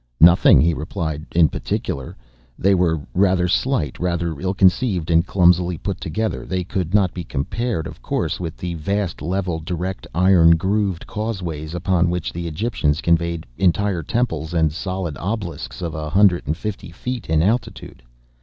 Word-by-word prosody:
"Nothing," 85 +2 +7
he 85 +1 +3
replied, 80 -1 -4
"in 85 -2 +6
particular." 70 -1 -4 0.4
They 100 +1 +3
were 85 -4 +2
rather 90 -1 +3
slight, 95 - 0
rather 85 -3 -1
ill 95 +1 -2
conceived, 95 -3 +2
and 85 0 +5
clumsily 90 -1 +3
put 95 +2 -4
together. 110 +8 -2
They 95 -1 -2
could 95 0 -2
not 95 -4 +3
be 90 - -5
compared, 80 - -2
of - - -9
course, - - -2
with 85 -3 -5
the 90 -1 -4
vast, 95 +3 -2
level, 90 0 -2
direct, 90 +3 -4
iron 85 -2 +5
grooved 95 0 -1
causeways 90 -8 -4
upon 90 -1 +1
which 90 -2 -3
the 85 0 -4
Egyptians 80 -4 -1
conveyed 85 -1 0
entire 95 0 +2
temples 80 - -2
and 80 -2 +2
solid 90 -2 -4
obelisks 85 - -4
of 85 -2 -3
a 75 -1 -4
hundred 95 -2 +3
and 75 +2 -1
fifty 105 -2 -5
feet 120 +6 -5
in 80 0 +3
altitude. 115 +6 -2
90 Hz, 160 wpm, -21 LUFS, 80-95 Hz, 0.4 s, Nothing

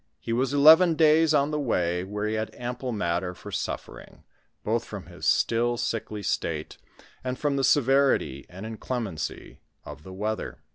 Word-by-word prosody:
He 115 - -4
was 130 +3 +1
eleven 160 +4 +7
days 160 0 +5
on 145 -1 +2
the 150 - -1
way, 90 -9 0
where 105 +2 -3
he 110 - -1
had 110 0 -3
ample 125 +1 -4
matter 90 -3 -2
for - - -10
suffering, - - -6 0.4
both - - 0
from - - -8
his - - -6
still 120 +1 +2
sickly 110 -2 -3
state, 80 -4 -3 0.4
and 130 0 -3
from 145 0 0
the 135 - 0
sever 135 +1 +4
ity 70 -2 -6
and 95 +4 -9
inclemency 110 -6 -5 0.3
of 75 0 -9
the 95 - -11
weather. 105 +3 -4
115 Hz, 170 wpm, -26 LUFS, 95-140 Hz, 0.4 s, eleven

